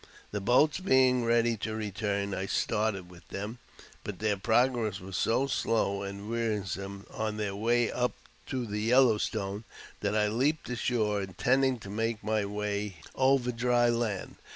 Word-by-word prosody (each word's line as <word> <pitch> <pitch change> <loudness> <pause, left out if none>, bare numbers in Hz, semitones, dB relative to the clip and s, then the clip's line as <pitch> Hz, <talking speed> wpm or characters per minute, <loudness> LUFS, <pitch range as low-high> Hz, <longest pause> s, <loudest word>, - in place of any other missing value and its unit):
The 105 - -2
boats 130 - +4
being 130 -8 +4
ready 115 0 +3
to 110 +1 -3
return, 100 -1 -2
I 95 0 -2
started 105 -4 0
with 90 -1 -16
them, 105 +5 -5 0.4
but 105 -3 -5
their 105 0 +1
progress 115 -1 +1
was 95 +1 -8
so 125 +4 +2
slow 100 -7 0
and 100 +1 -6
wearisome 100 -4 -3
on 110 -1 -3
their 105 -2 -2
way 120 +3 +2
up 125 0 0 0.3
to 130 -2 -2
the 105 -1 -3
Yellow 120 -1 +5
Stone 100 0 -2 0.4
that - - -1
I 105 -1 +3
leaped 135 +9 0
ashore, 110 -4 0
intending 125 +8 +1
to 100 - -8
make 115 +1 -2
my 110 -1 +1
way 105 -1 -3 0.2
over 130 -2 +3
dry 120 0 +2
land. 115 -5 -2
110 Hz, 155 wpm, -30 LUFS, 100-120 Hz, 0.4 s, Yellow